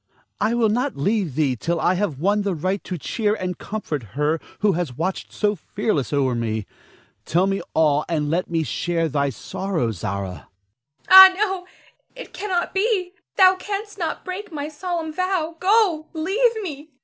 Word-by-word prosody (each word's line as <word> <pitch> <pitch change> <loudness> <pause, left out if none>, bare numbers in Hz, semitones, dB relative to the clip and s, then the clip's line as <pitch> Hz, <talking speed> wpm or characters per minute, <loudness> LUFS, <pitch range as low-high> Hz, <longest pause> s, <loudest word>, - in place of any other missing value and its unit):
I 230 - +1
will 230 -2 +3
not 250 +5 -1
leave 190 - 0
thee 140 -4 +1
till 170 +8 -2
I 175 - +2
have 185 -6 -1
won 200 +7 +1
the 200 -3 -1
right 185 +5 -2
to 180 - -4
cheer 210 +6 -1
and 180 -3 -4
comfort 200 -9 -4 0.2
her 150 +2 +1 0.2
who 210 -1 +4
has 165 -8 -3
watched 185 +4 -3
so 210 -1 +1
fearlessly 155 - -2
o'er 130 -3 +2
me. 110 -3 -2 0.6
Tell 175 +3 +2
me 195 0 -1
all, 150 -2 +3
and 155 -3 0
let 170 +4 -1
me 165 -1 0
share 165 +2 -1
thy 140 -1 0
sorrow, 150 - -3
Zara. 100 0 -3
Zara. 85 -5 -12 0.6
Ah, 380 0 +12
no! 385 -3 -1 0.5
It - - -10
cannot 370 -4 -2
be! 390 -3 +1 0.3
Thou 375 -1 +7
canst 410 +1 -5
not 330 -3 -3
break 375 +1 -6
my 295 -1 -4
solemn 325 0 -4
vow. 360 -2 -1
Go! 370 -6 +3
leave 425 +9 +1
me! 300 -3 -7
205 Hz, 175 wpm, -22 LUFS, -, 0.6 s, Ah